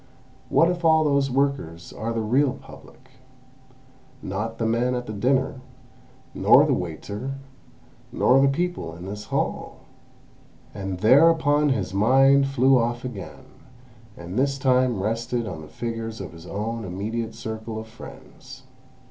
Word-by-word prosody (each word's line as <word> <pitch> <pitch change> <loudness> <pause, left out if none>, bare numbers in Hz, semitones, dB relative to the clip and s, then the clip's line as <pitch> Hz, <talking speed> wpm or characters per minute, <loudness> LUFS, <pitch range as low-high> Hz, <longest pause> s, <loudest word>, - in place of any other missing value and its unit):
What 165 - +4
if 175 0 -2
those 155 -4 +3
workers 130 -12 -2
are 115 +1 -4
the 115 -1 -1
real 130 +5 +2
Public, - - -15 1.1
not 110 +4 -4
the 115 - -1
men 120 +3 +1
at 125 0 -4
the 110 - -6
dinner, 130 +5 0 0.7
nor - - +5
the - - +1
waiter, 100 - -5 0.8
nor 135 +2 +4
the 140 - +5
people 140 - -2
in 85 +2 -9
this 105 +2 -7
hall!" - - -3 0.9
And 95 -2 -5
thereupon 145 +4 +5
his 105 -8 -1
mind 135 +6 +4
flew 135 -1 +4
off 120 +1 -2
again, 125 +2 -8 0.7
and 90 +6 -5
this 140 0 +1
time 130 -4 +2
rested 115 +2 -2
on 80 -7 -6
the 80 - -11
figures 115 +2 -5
of 95 - -7
his 85 +1 -12
own 110 +4 -4
immediate 110 +4 -4
circle 110 -1 -6
of 110 - -6
friends. 110 0 -13
115 Hz, 140 wpm, -24 LUFS, 105-135 Hz, 1.1 s, nor